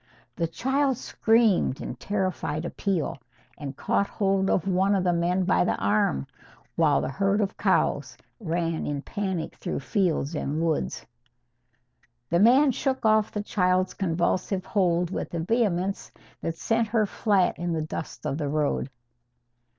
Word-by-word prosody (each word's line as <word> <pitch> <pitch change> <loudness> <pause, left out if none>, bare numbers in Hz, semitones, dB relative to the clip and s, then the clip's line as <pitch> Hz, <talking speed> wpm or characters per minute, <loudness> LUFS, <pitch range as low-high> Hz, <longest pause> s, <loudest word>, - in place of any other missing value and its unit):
The 170 - 0
child 265 - 0
screamed 225 - +2
in - - -5
terrified 175 - -2
appeal, 170 -6 -2 0.4
and 140 -2 -7
caught 200 - +1
hold 195 -1 0
of 190 - +1
one 190 +2 +2
of 190 - +1
the 175 -1 +2
men 175 +2 +1
by 185 0 +3
the - - +1
arm, 100 -10 +1 0.5
while - - +3
the - - -2
herd 195 +6 +1
of 200 -2 -1
cows 145 - +1 0.2
ran 165 -4 -2
in 145 -1 -3
panic 190 -5 -3
through - - -4
fields 170 -3 0
and 150 0 -2
woods. 165 -2 -1 1.3
The 170 - +3
man 260 +7 +6
shook 265 0 -2
off 215 -1 +3
the 210 - -3
child's 185 -2 +1
convulsive 185 +1 -1
hold 175 -3 +1
with 175 - -4
a - - -1
vehemence 195 -1 0 0.3
that 165 - -3
sent 225 +3 +1
her 215 0 +2
flat 200 -3 +1
in 175 0 -2
the 160 -1 -1
dust 155 +1 -6
of 140 - -2
the 145 -2 -1
road. 145 -2 0
185 Hz, 150 wpm, -26 LUFS, 160-205 Hz, 1.3 s, man